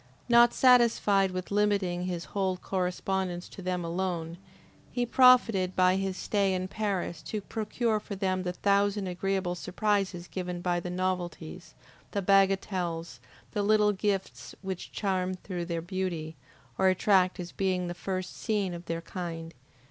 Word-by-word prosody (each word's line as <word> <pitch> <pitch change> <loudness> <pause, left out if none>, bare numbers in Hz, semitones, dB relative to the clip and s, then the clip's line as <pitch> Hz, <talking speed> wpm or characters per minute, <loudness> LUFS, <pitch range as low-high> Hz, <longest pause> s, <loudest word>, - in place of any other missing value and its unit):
Not 240 0 +6
satisfied 230 -6 +4
with 185 0 -5
limiting 200 -4 +1
his 175 -2 -3
whole 190 -2 0
correspondence 180 -1 -2
to 195 - -10
them 180 -1 -2
alone, 170 -1 -3 0.5
he 245 -1 0
profited 235 -7 +5
by 185 0 +4
his 195 -1 -2
stay 200 -2 +1
in 185 0 -2
Paris 195 -6 -2
to 215 - -4
procure 220 +2 -1
for 205 -1 -7
them 185 -1 0
the 180 -1 -2
thousand 200 +2 +1
agreeable 185 0 -1
surprises 190 -1 -1
given 180 -1 -4
by 175 0 0
the 180 - -5
novelties, 180 -2 -4 0.4
the 200 - 0
bagatelles, 185 -6 +1 0.3
the 210 - -1
little 210 0 +4
gifts 190 - -3
which 190 -2 -5
charm 185 -2 -1
through 180 -1 -5
their 170 -1 -3
beauty, 175 -3 -3 0.4
or 190 - +4
attract 185 0 +3
as 175 -1 -5
being 185 -2 0
the 175 - -3
first 185 +1 -4
seen 205 -5 -1
of 175 0 -8
their 165 0 -2
kind. 165 -2 -6
185 Hz, 150 wpm, -29 LUFS, 175-200 Hz, 0.5 s, Not